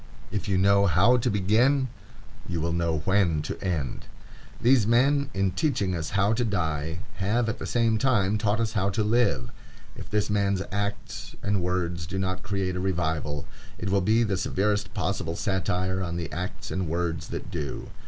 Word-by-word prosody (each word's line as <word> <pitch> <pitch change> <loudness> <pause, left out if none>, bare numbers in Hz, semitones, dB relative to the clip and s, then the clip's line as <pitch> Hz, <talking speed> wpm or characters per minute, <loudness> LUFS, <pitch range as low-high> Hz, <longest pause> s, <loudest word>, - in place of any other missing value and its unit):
If 105 - -3
you 95 -2 +2
know 100 +1 +4
how 100 +9 +5
to 120 +1 0
begin, 115 +7 +3 0.6
you 85 -2 -1
will 80 +1 -1
know 85 -3 0
when 90 -6 +2
to - - -5
end. 80 -9 -2 0.5
These 120 -3 +4
men, 140 +4 +3
in 95 -1 0
teaching 105 - 0
us 80 -3 -3
how 100 +2 +3
to 120 +2 0
die, 80 -6 -1 0.2
have 110 +5 +1
at 115 - -2
the - - -4
same 115 -2 +2
time 105 -6 +2
taught 105 0 +1
us 115 -1 0
how 100 -2 +1
to 105 +2 0
live. 105 - +1 0.4
If - - -9
this 105 -1 +1
man's 100 -2 +1
acts 100 +1 -4
and 100 -2 +1
words 85 -2 -1
do 95 +3 -4
not 95 -1 -1
create 95 -2 -2
a - - -2
revival, 80 -5 -1 0.3
it 95 +1 -3
will 100 0 +3
be 110 +5 +3
the 100 -4 0
severest 105 +2 0
possible 90 -4 -1
satire 95 -1 0
on 85 -2 -3
the 85 -2 -4
acts 90 +3 -5
and 95 -2 -1
words 85 -1 -2
that 95 - -6
do. 75 -6 -5
95 Hz, 185 wpm, -26 LUFS, 85-105 Hz, 0.6 s, how